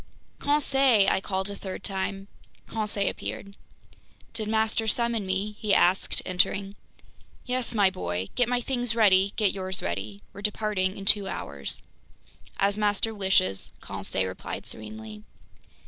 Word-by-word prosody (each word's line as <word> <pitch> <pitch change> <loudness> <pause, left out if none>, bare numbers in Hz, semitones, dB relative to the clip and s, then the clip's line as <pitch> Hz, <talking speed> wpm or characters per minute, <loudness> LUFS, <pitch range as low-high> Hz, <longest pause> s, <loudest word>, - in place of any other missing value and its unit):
"Conseil!" 270 -7 +4
I 190 - +1
called 190 0 -2
a - - -6
third 190 -1 -7
time. 195 0 -3 0.4
Conseil 210 -2 -2
appeared. 200 0 -5 0.8
"Did 220 -2 -3
master 220 0 +1
summon 230 -2 +1
me?" 200 +3 -2
he 210 -2 +1
said, 185 +1 +4
entering. 195 +2 0 0.7
"Yes, 250 -1 -1
my 200 -3 +4
boy. 90 - -3
Get 245 -1 +2
my 245 0 +1
things 245 -2 -1
ready, 200 -3 +5
get 210 -4 +3
yours 190 -1 -3
ready. 100 +4 -4
We're 200 - -9
departing 205 -2 0
in 195 - -7
two 200 0 +5
hours." 70 - -4 0.7
"As 200 +1 +1
master 210 +1 +1
wishes," 190 - +2
Conseil 95 - -3
replied 95 - -6
serenely. 110 0 -6
200 Hz, 135 wpm, -27 LUFS, 185-220 Hz, 0.8 s, ready